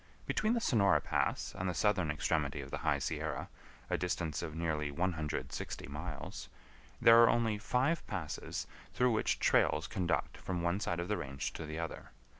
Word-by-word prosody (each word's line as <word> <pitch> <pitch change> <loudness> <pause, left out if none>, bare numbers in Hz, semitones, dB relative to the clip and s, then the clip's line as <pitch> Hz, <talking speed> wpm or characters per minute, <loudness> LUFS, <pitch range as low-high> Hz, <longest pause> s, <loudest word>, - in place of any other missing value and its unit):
Between 215 +2 +1
the 240 - +2
Sonora 100 - +4
Pass - - -1
and 90 0 -2
the 90 - -2
southern 95 -6 +2
extremity 75 -1 0
of 70 0 -9
the - - -3
High - - +2
Sierra, 80 -2 -3 0.4
a - - 0
distance 85 -4 -1
of 80 -2 -5
nearly 80 -3 -1
160 80 0 -3
miles, 75 +1 -6 0.5
there 115 0 +8
are 115 - +7
only 115 -3 +2
five 130 +9 +1
passes 90 -7 -4 0.3
through 125 0 +4
which 110 - +1
trails - - +3
conduct 90 -2 -1
from 90 -2 -3
one 85 +3 +1
side 85 -5 -1
of 85 - -2
the 105 +1 0
range 70 0 -4
to 80 - -6
the 80 +1 -5
other. 85 -1 -5
85 Hz, 175 wpm, -34 LUFS, 75-105 Hz, 0.5 s, there